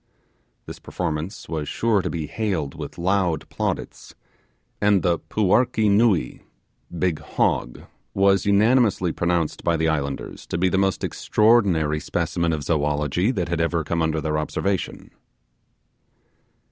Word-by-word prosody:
This - - -9
performance 85 +3 -4
was 75 -3 -4
sure 110 -4 +1
to 90 - -3
be 80 -3 -3
hailed 85 -5 -2
with - - -8
loud 90 -3 0
plaudits, - - -4 0.7
and 100 -2 +3
the 85 -3 +1
'puarkee 110 +1 +2
nuee' 105 -3 +2 0.6
(big 85 -2 0
hog) - - -1 0.3
was 95 -1 +3
unanimously 105 -3 +3
pronounced 85 -2 -1
by 85 -1 +1
the 80 +1 +1
islanders 70 -3 -4
to - - -3
be 90 +2 +2
the 95 - +1
most 95 -1 0
extraordinary 95 -9 +2
specimen 85 +2 -1
of 75 -2 -2
zoology 75 - 0
that 90 -10 -2
had 85 -1 0
ever 85 -1 0
come 85 +3 -1
under 80 -1 0
their 75 0 -1
observation. 95 +5 -3
85 Hz, 135 wpm, -23 LUFS, 80-100 Hz, 0.7 s, and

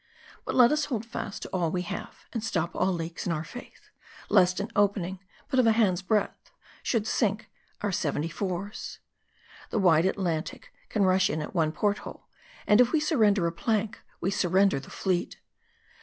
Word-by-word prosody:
But - - -3
let 245 -2 +7
us 300 0 +1
hold 230 -5 -3
fast 225 -3 -6
to - - -7
all 175 -3 0
we 180 +2 -2
have; 195 +2 -7
and 230 - -3
stop 175 -8 -1
all 190 - +2
leaks 165 -1 -4
in - - +1
our 155 -1 -1
faith; 245 +9 -12 0.4
lest 180 +1 +4
an 205 +2 -4
opening, 195 -2 +1 0.3
but 265 -3 +1
of 245 - +5
a 225 - +6
hand's 200 -6 +2
breadth, 210 +2 -1 0.3
should 225 -4 0
sink 215 -1 0 0.3
our 205 -1 0
seventy 155 -3 -1
fours. 190 +3 -4 0.7
The - - -2
wide 175 -4 +4
Atlantic 175 -4 -3 0.2
can 210 - +1
rush 185 +1 +3
in 155 - -1
at 150 - -5
one 160 -4 +2
port 205 +5 0
hole; - - -10 0.4
and 210 +3 +6
if 245 0 +3
we 315 - +3
surrender 215 - +3
a 170 - +1
plank, 215 +4 -1 0.2
we 190 - -1
sur 185 -2 0
render 190 -3 +4
the 135 - -12
fleet. 185 -3 -2
195 Hz, 185 wpm, -28 LUFS, 175-220 Hz, 0.7 s, let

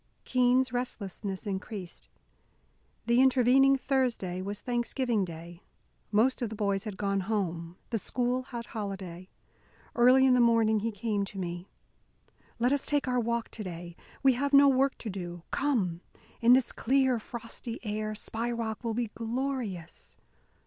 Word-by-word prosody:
Keene's 255 0 +3
restlessness 205 -5 -4
increased. 195 -2 -6 1.0
The 235 +2 +4
intervening 265 +1 +5
Thursday 250 -10 -1
was 200 +2 -4
Thanksgiving 240 -2 0
Day; 170 0 -8 0.5
most 235 +6 +3
of 235 - -1
the 220 - -6
boys 200 -1 -1
had 205 -3 -5
gone 200 -1 0
home; 180 -4 -2
the 225 - 0
school 250 +4 -1
had 240 -2 -7
holiday. 190 -5 -6 0.7
Early 255 +2 +6
in 260 - +5
the 250 - +4
morning 225 -2 +4
he 225 +2 -2
came 205 -1 -1
to 195 - -10
me. 175 0 -4 0.9
"Let 245 +3 +2
us 285 - -1
take 290 -2 +1
our 250 -1 +1
walk 235 0 -1
to 220 - -7
day. 175 -2 -7 0.3
We 265 -1 +6
have 280 +3 -1
no 280 0 +8
work 270 0 +3
to 225 - -6
do. 175 -2 -6
Come! 200 -12 0 0.4
In 235 +1 +7
this 255 -1 +3
clear, 260 -1 +2
frosty 230 +1 -7
air, 215 0 -2
Spy 225 +2 -3
Rock 230 -1 -3
will 230 -2 -2
be 235 -2 -2
glorious!" 230 -6 -4
230 Hz, 150 wpm, -29 LUFS, 195-250 Hz, 1.0 s, no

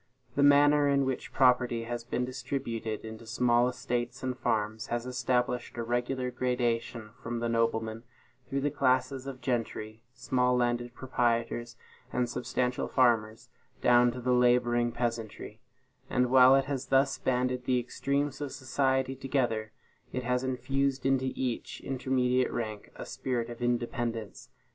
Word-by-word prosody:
The 140 - +1
manner 145 0 +6
in 140 -1 +3
which 130 -1 -3
property 125 -3 +3
has 120 0 -4
been 125 +1 -2
distributed 125 -4 -4
into 110 +1 -9
small 120 +1 +3
estates 125 0 -3
and 130 -1 -1
farms 110 -1 -1
has 120 0 -2
established 125 -1 -1
a 120 - -2
regular 125 +2 -1
gradation 120 -3 -1
from 120 +1 -4
the 120 0 -1
noblemen, 115 -1 0 0.5
through 140 0 -1
the 145 +1 0
classes 135 -1 +1
of 130 -2 -7
gentry, 115 -3 -3
small 125 0 +1
landed 120 0 0
proprietors, 120 -2 -1 0.3
and 125 -1 0
substantial 125 +1 -1
farmers, 115 -4 +2 0.3
down 120 0 +5
to 125 - -6
the 125 +1 +1
laboring 120 -1 +3
peasantry; 115 -2 -4 0.5
and 125 0 +1
while 130 0 +8
it 135 -1 +2
has 135 -2 -3
thus 135 +1 +2
banded 125 0 0
the 125 0 +2
extremes 140 +4 -1
of 145 -2 -3
society 130 0 0
together, 125 -5 -1 0.5
has 125 +1 0
infused 135 +1 -1
into 130 -1 +2
each 125 -3 -3
intermediate 130 -1 +1
rank 110 -3 -5
a - - -7
spirit 120 -2 -3
of 120 - -9
independence. 120 -2 -2
125 Hz, 140 wpm, -29 LUFS, 120-130 Hz, 0.5 s, while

